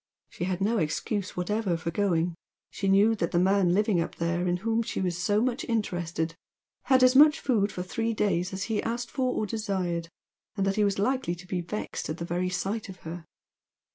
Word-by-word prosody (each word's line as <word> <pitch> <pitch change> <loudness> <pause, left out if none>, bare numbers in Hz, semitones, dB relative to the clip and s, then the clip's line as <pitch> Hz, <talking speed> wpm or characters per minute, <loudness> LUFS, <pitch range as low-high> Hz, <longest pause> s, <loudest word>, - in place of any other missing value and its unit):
She 175 - -4
had 185 0 -2
no 220 +3 +2
excuse 185 +6 -2
whatever 190 0 0
for 170 +1 -3
going; 175 -2 +1 0.4
she 195 - -3
knew 200 +3 +5
that 170 - 0
the - - 0
man 190 0 +3
living 200 -1 +2
up 165 - -4
there 170 +2 -1
in 175 0 +1
whom 225 0 +2
she 230 - -3
was 180 -2 0
so 205 +5 +1
much 255 -1 -1
interested 175 -8 -2 0.5
had 260 -1 +5
as 255 0 +6
much 300 +2 +7
food 210 -6 +1
for 180 - -4
three 225 +5 -2
days 185 -4 0
as 190 +1 -3
he 215 0 -1
asked 240 +1 -3
for 255 -2 0
or 215 - 0
desired, 190 -6 -2 0.5
and 195 - +1
that 195 0 +1
he 210 - +4
was 200 -1 +1
likely 245 -3 0
to 175 +1 -12
be 180 -1 -2
vexed 190 0 -5
at 155 - -3
the 170 - -4
very 180 +2 -1
sight 195 +4 -3
of 185 - -10
her. 165 0 -8
195 Hz, 210 wpm, -28 LUFS, 175-220 Hz, 0.5 s, much